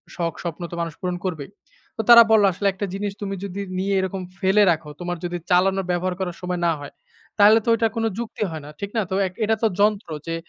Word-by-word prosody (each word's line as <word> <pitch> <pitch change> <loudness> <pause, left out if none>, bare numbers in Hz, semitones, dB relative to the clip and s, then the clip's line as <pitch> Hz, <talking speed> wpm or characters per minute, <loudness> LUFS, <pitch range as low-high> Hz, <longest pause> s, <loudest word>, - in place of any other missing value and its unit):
শখ, 170 -2 -2
স্বপ্ন 170 0 -5
তো - - -5
মানুষ 165 -2 -3
পূরণ 180 -1 -2
করবেই।" 160 -6 -4 0.5
তো 220 - +1
তারা 235 0 +11
বলল, 215 -2 +6
"আসলে 200 +3 -1
একটা 195 +1 -3
জিনিস 205 +1 -3
তুমি 195 -1 -3
যদি 200 +1 -5 0.2
নিয়ে 200 +1 0
এরকম 190 0 -3 0.2
ফেলে 195 +2 +4
রাখো, 155 -2 -3
তোমার 175 0 -3
যদি 175 0 -3
চালানো 190 +2 +3
ব্যবহার 180 +1 -1
করার 180 -2 -3
সময় 180 -1 -3
না - - +3
হয়, 145 - -9 0.5
তাহলে 215 +2 +7
তো - - 0
ওইটা 230 0 +2
কোনো 225 0 +1
যুক্তি 235 -2 -4
হয় 160 - -6
না। - - -9
ঠিক 200 - -4
না? 220 - +3
তো 190 - 0
এক 185 - -10
এটা 220 - +2
তো 225 - +6
যন্ত্র 210 -3 +2 0.2
যে, 165 - -2
190 Hz, 235 wpm, -22 LUFS, 175-205 Hz, 0.5 s, তারা